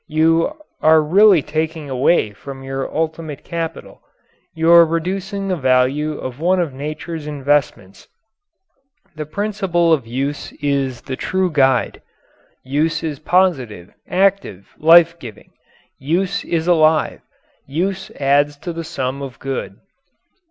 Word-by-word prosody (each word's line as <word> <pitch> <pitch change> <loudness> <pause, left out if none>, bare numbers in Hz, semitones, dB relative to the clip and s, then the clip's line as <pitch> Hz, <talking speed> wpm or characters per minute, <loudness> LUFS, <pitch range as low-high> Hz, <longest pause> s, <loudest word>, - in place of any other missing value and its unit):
You 165 - +2 0.3
are 160 0 +6
really 180 +2 +5
taking 160 -1 -3
away 130 -3 +1
from 135 +5 -10
your 135 0 -4
ultimate 160 -2 -4
capital; 165 -2 -6 0.5
you 165 +1 +2
are 170 0 +9
reducing 190 +5 -3
the 185 - 0
value 135 +2 +1
of 130 +1 -7
one 180 +3 +2
of 165 -6 -1
nature's 155 +3 -6
investments. 140 -9 -2 1.1
The 155 -1 -6
principle 190 -3 0
of 135 -7 -1
use 135 +5 -4
is 140 -3 -2
the 130 - -5
true 185 +5 -1
guide. 135 -4 +1 0.6
Use 160 +5 -1
is 150 -4 -4
positive, 130 - 0 0.2
active, 190 - 0
life 170 +1 +6
giving. 115 -8 -11 0.5
Use 175 +8 -1
is 165 -1 -1
alive. 160 -3 +2 0.5
Use 190 +6 -2
adds 145 +1 +2
to 175 +4 -6
the 165 0 -5
sum 135 -3 -4
of 135 -3 -7
good. 135 -7 -5
155 Hz, 125 wpm, -19 LUFS, 135-170 Hz, 1.1 s, are